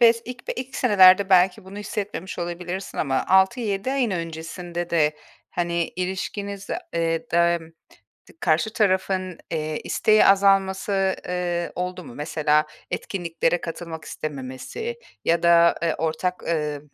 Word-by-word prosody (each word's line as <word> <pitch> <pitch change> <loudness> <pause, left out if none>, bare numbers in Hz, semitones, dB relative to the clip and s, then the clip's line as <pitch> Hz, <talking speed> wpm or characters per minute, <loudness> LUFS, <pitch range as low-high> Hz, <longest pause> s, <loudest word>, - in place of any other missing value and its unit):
bes 230 -1 +5
ilk 250 +1 -8
ilk 265 +1 -5
senelerde 195 -4 +6
belki 185 0 +4
bunu 195 +2 -9
hissetmemiş 205 -2 -5
olabilirsin 175 +2 -5
ama, 135 -3 0
6-7 200 +3 +2
ayın 255 -6 +1
öncesinde 170 +1 -5
de, 150 -3 +2 0.3
hani, 170 -1 -1
ilişkinizde, 195 +2 -3 0.2
eee, 165 -1 -1
dem 170 -1 +2 0.6
dı - - -16
karşı 170 +6 +1
tarafın, 190 -3 0
eee, 155 -1 -2
isteği 215 0 +4
azalması, 195 0 +3
eee, 175 -1 -2
oldu 180 0 -4
mu? 125 -3 -11
Mesela, 150 0 +1 0.2
etkinliklere 170 -2 -1
katılmak 165 -1 -6
istememesi 150 - -6 0.3
ya 170 0 +2
da, 170 0 +6
eee, 165 -2 +1
ortak, 165 +3 -1
eee, 150 -3 -1
180 Hz, 125 wpm, -24 LUFS, 165-195 Hz, 0.6 s, senelerde